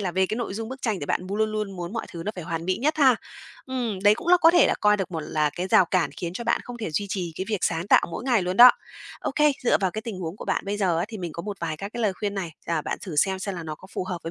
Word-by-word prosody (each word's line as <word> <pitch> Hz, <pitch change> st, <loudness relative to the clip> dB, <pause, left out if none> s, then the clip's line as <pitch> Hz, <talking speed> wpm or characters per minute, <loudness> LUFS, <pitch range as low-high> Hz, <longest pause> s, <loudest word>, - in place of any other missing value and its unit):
là 190 Hz, -3 st, -1 dB
về 190 Hz, +1 st, +2 dB
cái 215 Hz, -, -3 dB
nội 235 Hz, -5 st, -3 dB
dung 225 Hz, +1 st, -4 dB
bức 260 Hz, +1 st, -8 dB
tranh 215 Hz, -6 st, -1 dB
thì 145 Hz, -, -4 dB
bạn -, -, 0 dB
m 195 Hz, -, -4 dB
luôn 215 Hz, 0 st, 0 dB
luôn 210 Hz, -3 st, -3 dB
muốn 175 Hz, +1 st, -5 dB
mọi 225 Hz, -, -4 dB
thứ 170 Hz, -, -6 dB
nó 210 Hz, -, -1 dB
phải 180 Hz, -, -7 dB
hoàn 165 Hz, -1 st, -4 dB
mỹ 185 Hz, +1 st, 0 dB
nhất 300 Hz, +5 st, 0 dB
ha. 265 Hz, -5 st, +5 dB, 0.5 s
Ừm, 245 Hz, -6 st, -2 dB
đấy 205 Hz, +1 st, +6 dB
cũng 335 Hz, -, -7 dB
là 360 Hz, -, +8 dB
có 330 Hz, -2 st, +6 dB
thể 345 Hz, -, +5 dB
là -, -, +2 dB
coi 210 Hz, 0 st, +4 dB
được 195 Hz, -2 st, -3 dB
một 165 Hz, -2 st, -3 dB
là 150 Hz, -1 st, 0 dB
cái 180 Hz, -, -2 dB
rào 185 Hz, -, +6 dB
cản 170 Hz, -4 st, +1 dB
khiến 170 Hz, -1 st, -4 dB
cho 235 Hz, +6 st, -5 dB
bạn -, -, +1 dB
không 245 Hz, -, -8 dB
thể 215 Hz, -7 st, -4 dB
duy 200 Hz, +6 st, -1 dB
trì 180 Hz, -4 st, -3 dB
cái 190 Hz, -, -3 dB
việc 215 Hz, -2 st, 0 dB
sáng 165 Hz, +1 st, -1 dB
tạo -, -, +5 dB
mỗi 215 Hz, -, -5 dB
ngày 240 Hz, -6 st, +2 dB
luôn 180 Hz, +1 st, -2 dB
đó. 245 Hz, +3 st, +11 dB, 0.5 s
Okay, 300 Hz, +1 st, +2 dB
dựa 245 Hz, -, +3 dB
vào 190 Hz, -2 st, 0 dB
cái 215 Hz, +4 st, -5 dB
tình 220 Hz, -5 st, -6 dB
huống 170 Hz, 0 st, -5 dB
của -, -, -8 dB
bạn -, -, -1 dB
bây 200 Hz, +1 st, -1 dB
giờ 185 Hz, -5 st, +1 dB
á 170 Hz, -, 0 dB
thì 220 Hz, -, -7 dB
mình 175 Hz, -3 st, -5 dB
có 170 Hz, -, -6 dB
một 205 Hz, +1 st, -5 dB
vài 165 Hz, -2 st, -3 dB
các 200 Hz, +5 st, -7 dB
cái 240 Hz, -, -4 dB
lời 210 Hz, -3 st, +2 dB
khuyên 200 Hz, +2 st, -4 dB
này, 185 Hz, -4 st, -3 dB, 0.2 s
à, 165 Hz, -2 st, 0 dB
bạn -, -, -3 dB
thử 175 Hz, -6 st, -7 dB
xem 190 Hz, +5 st, +2 dB
xem 195 Hz, +1 st, -4 dB
là 170 Hz, -, -5 dB
nó 155 Hz, -1 st, -5 dB
có 190 Hz, -, -15 dB
phù -, -, -3 dB
hợp 185 Hz, -1 st, -4 dB
với 165 Hz, -, -5 dB
195 Hz, 345 wpm, -25 LUFS, 175-220 Hz, 0.5 s, đó